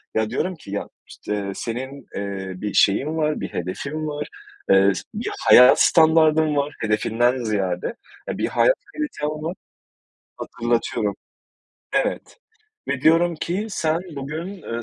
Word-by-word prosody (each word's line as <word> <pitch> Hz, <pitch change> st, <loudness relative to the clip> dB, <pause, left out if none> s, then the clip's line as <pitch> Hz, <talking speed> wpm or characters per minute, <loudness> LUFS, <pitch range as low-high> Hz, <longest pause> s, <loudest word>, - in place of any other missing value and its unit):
ya 110 Hz, -1 st, +1 dB
diyorum 175 Hz, +10 st, -2 dB
ki 140 Hz, -11 st, -12 dB
ya 100 Hz, -, -4 dB, 0.2 s
işte 100 Hz, -1 st, -4 dB
senin, 130 Hz, +3 st, -5 dB
ııı, 95 Hz, -2 st, -5 dB
bir 105 Hz, -1 st, -3 dB
şeyin 145 Hz, +11 st, +3 dB
var, 155 Hz, -1 st, 0 dB
bir -, -, -4 dB
hedefin 140 Hz, -, -4 dB
var, 150 Hz, 0 st, -4 dB, 0.4 s
ııı, 95 Hz, +1 st, +6 dB, 0.2 s
bir -, -, -3 dB, 0.2 s
hayat 125 Hz, +1 st, +8 dB
standardın 160 Hz, -2 st, +4 dB
var 145 Hz, +1 st, 0 dB
hedefinden 115 Hz, +3 st, +1 dB
ziyade, 100 Hz, -, -2 dB, 0.3 s
eee, -, -, -3 dB
bir -, -, 0 dB
hayat -, -, +3 dB, 0.2 s
kalitem 300 Hz, -, -3 dB
var, 165 Hz, +3 st, -3 dB, 0.8 s
hatırlatıyorum. -, -, -1 dB, 0.8 s
Evet -, -, -1 dB, 0.5 s
ve 130 Hz, -, -1 dB
diyorum 165 Hz, +2 st, +4 dB
ki 180 Hz, +6 st, -3 dB
sen 160 Hz, -4 st, 0 dB, 0.2 s
bugün, 160 Hz, +7 st, -6 dB
ııı, 115 Hz, -3 st, -4 dB
140 Hz, 135 wpm, -22 LUFS, 105-160 Hz, 0.8 s, hayat